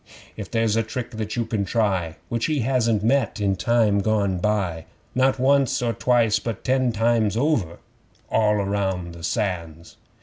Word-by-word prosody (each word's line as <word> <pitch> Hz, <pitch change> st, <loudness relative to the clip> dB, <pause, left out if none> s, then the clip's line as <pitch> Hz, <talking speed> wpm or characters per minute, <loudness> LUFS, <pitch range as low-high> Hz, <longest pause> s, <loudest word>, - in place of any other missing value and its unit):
'If -, -, -7 dB
there's 115 Hz, -2 st, +1 dB
a 115 Hz, -, +3 dB
trick 115 Hz, +3 st, -5 dB
that 110 Hz, -2 st, -4 dB
you 120 Hz, -1 st, -1 dB
can 110 Hz, -2 st, -1 dB
try 95 Hz, -6 st, 0 dB
Which 115 Hz, -1 st, -1 dB
he 155 Hz, -4 st, 0 dB
hasn't 115 Hz, -4 st, +1 dB
met 120 Hz, 0 st, +1 dB
in 100 Hz, -2 st, +1 dB
time 105 Hz, +1 st, +2 dB
gone 100 Hz, -3 st, 0 dB
by, 90 Hz, -5 st, -1 dB, 0.3 s
Not 130 Hz, +1 st, +2 dB
once 135 Hz, 0 st, +2 dB
or 120 Hz, -2 st, 0 dB
twice, 115 Hz, -2 st, +2 dB
but 115 Hz, -1 st, -5 dB
ten 130 Hz, -1 st, +1 dB
times 115 Hz, -1 st, +1 dB
over; 115 Hz, -, 0 dB, 0.5 s
(All 105 Hz, -1 st, +2 dB
round 95 Hz, -3 st, -2 dB
the 85 Hz, -, -11 dB
Sands!) 85 Hz, -4 st, -3 dB
110 Hz, 165 wpm, -23 LUFS, 100-120 Hz, 0.5 s, a